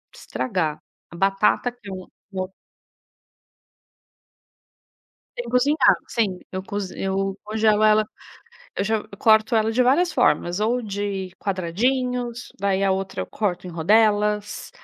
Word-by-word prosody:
estragar. 165 -10 -2 0.3
A - - -10
batata 195 +6 +2
que 235 -5 -13
eu 185 -1 -7 0.2
que 195 - -10
eu 185 +1 -4 2.8
Sem 240 -1 -4
cozinhar, 265 +4 +4
sim, 200 -6 -1
eu 185 0 -5
cozi 200 -1 -5
eu 195 0 -1
congelo 215 0 +2
ela 215 0 +4 0.7
eu 195 - 0
já 220 +1 +1
eu 210 -1 -12
corto 220 +1 +4
ela 220 +1 +2
de 250 +3 +3
várias 310 +9 +3
formas, 175 +5 +2
ou 235 +4 +1
de 200 -3 -4
quadradinhos, 240 +6 -1
daí 195 0 +1
a 190 - +3
outra 190 0 -3
eu - - -7
corto 185 -4 -2
em 180 - -6
rodelas, 210 +4 +2
210 Hz, 135 wpm, -23 LUFS, 190-225 Hz, 2.8 s, cozinhar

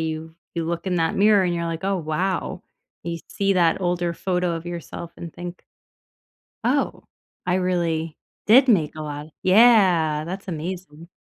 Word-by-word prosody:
you 160 0 -4 0.2
you 170 -1 -1
look 170 +2 -3
in 180 -1 0
that 165 -1 +1
mirror 205 -1 +5
and 175 -1 0
you're 170 0 -2
like, 165 +1 -4
"Oh, 195 0 +1
wow," 175 +3 -2 0.4
you 170 0 -3
see 195 0 +1
that 170 -1 +3
older 175 -1 0
photo 180 0 -1
of 165 +1 -8
yourself 170 0 -7
and 170 -2 -8
think 175 0 -8 1.0
Oh, 275 +3 0 0.4
I 180 0 +1
really 170 -4 -1 0.3
did 255 +5 +7
make 170 -10 +3
a 155 - -5
lot, 145 0 -6 0.2
yeah, 185 -8 +5
that's 190 +3 -6
amazing. 170 -1 -6
175 Hz, 160 wpm, -23 LUFS, 165-190 Hz, 1.0 s, did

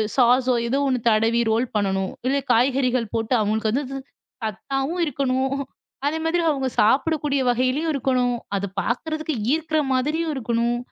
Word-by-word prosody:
சாஸோ 255 0 +4
ஏதோ 265 - 0
ஒண்ணு 255 -2 +1
தடவி 225 +2 +3
ரோல் 230 +3 +2
பண்ணணும். 195 -2 0 0.2
இல்ல 275 +2 +2
காய்கறிகள் 250 -1 +2
போட்டு 225 +2 -1
அவங்களுக்கு 215 +1 0
வந்து 270 +6 0 0.6
சத்தாவும் 270 - -2
இருக்கணும், 265 -1 0 0.5
அதே 315 +2 -1
மாதிரி 340 +1 +1
அவங்க 270 -3 -1
சாப்பிடக்கூடிய 280 +4 +2
வகையிலயும் 255 +6 0
இருக்கணும். 250 -2 +1 0.2
அத 195 - -2 0.2
பார்க்குறதுக்கு 310 - -2 0.2
ஈர்க்கிற 315 -1 0
மாதிரியும் 305 +5 0
இருக்கணும். 235 -1 0
255 Hz, 130 wpm, -23 LUFS, 235-290 Hz, 0.6 s, சாஸோ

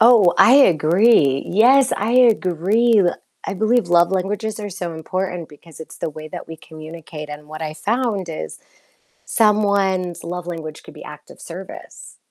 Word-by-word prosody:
Oh, 225 -6 +5
I 245 - +6
agree. 170 - +3
Yes, 255 +7 +4
I 215 +4 -2
agree. 220 -1 +3 0.4
I 200 - -4
believe 220 -1 +1
love 175 +1 +3
languages 210 +3 -3
are 205 -1 -6
so 175 -3 -6
important 180 +1 -5
because 155 +2 -16
it's 160 - -11
the 160 - -4
way 155 +1 -10
that - - -9
we 160 - -8
communicate, 155 -1 -11
and 150 0 -10
what 155 +1 -8
I 155 0 -5
found 210 -1 -2
is 160 - -7 0.7
someone's 200 -5 +1
love 175 0 -6
language 160 -3 -7
could - - -14
be - - -12
act - - -12
of - - -15
service, - - -11
180 Hz, 160 wpm, -19 LUFS, 160-215 Hz, 0.7 s, I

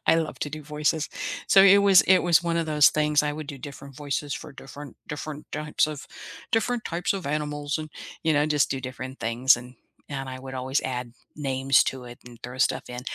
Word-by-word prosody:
I - - +6
love 160 -1 -2
to 145 - -2
do 155 +1 -7
voices. 150 +1 -1 0.4
So, 195 - +7
i - - +7
it 200 - +8
was 200 -2 +6
it 190 0 +5
was 175 -1 +4
one 170 -1 -1
of 165 - 0
those 150 -3 +6
things. 150 -1 +2
I 150 - -1
would 155 0 -6
do 140 - -7
different 140 0 -10
voices 145 0 -3
for 150 - -8
different 140 0 -11
different 150 0 -6
types 150 0 0
of 150 -2 -7 0.5
different 230 +1 +1
types 175 +3 -1
of 190 -6 -5
animals 145 0 -2
and, 155 -1 -7 0.3
you 160 - +2
know, 145 0 +3
just 150 -2 +2
do 135 - -2
different 130 +1 -7
things, 120 +3 +4
and 125 +1 -11 0.3
and 135 -2 -5
I 130 0 -7
would 130 0 -8
always 130 +2 -1
add 125 -2 -4 0.2
names 135 -2 +2
to 130 -1 -4
it 120 0 -11
and 120 - -12
throw 125 +1 -8
stuff - - +2
in. 125 0 -6
145 Hz, 225 wpm, -25 LUFS, 130-155 Hz, 0.5 s, it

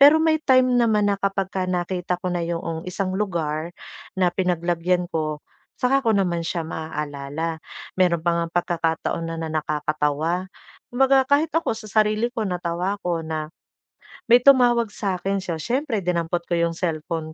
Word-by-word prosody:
Pero 290 +3 +8
may 315 -1 +3
time 255 -2 +4
naman 210 -3 +3
na 200 - 0
kapagka 195 -1 -1
nakita 180 0 -1
ko 185 - -2
na 175 -1 -1
'yoong 165 -1 -3
isang 185 +1 -2
lugar 170 -5 -2 0.5
na 180 -2 +3
pinaglagyan 175 0 0
ko, 155 -2 -2 0.4
'tsaka 270 +2 +2
ko - - +5
naman 175 -3 0
siya 170 -1 -2
maaalala. 150 0 -4 0.4
Mayro'n 175 -3 +3
pa 170 - +2
ngang 170 -1 -2
pagkakataon 165 -1 -1
na 165 0 -4
na 160 - -3
nakakatawa. 155 +3 -1 0.4
Kumbaga 265 +1 +3
kahit 295 +3 +3
ako 330 -8 0
sa 220 - -9 0.2
sarili 215 +3 +1
ko 220 -5 -2
natawa 180 +2 -2
ako 175 -4 -2
na 160 0 -4 0.8
may 240 - +9
tumawag 245 -3 +5
sa 195 -3 -2
'kin. 195 +1 -1
So 170 -3 -3
siyempre 245 - -1
dinampot 170 -1 -1
ko 175 - -2
'yong 170 0 0
cellphone 160 -1 -3
180 Hz, 160 wpm, -23 LUFS, 165-210 Hz, 0.8 s, may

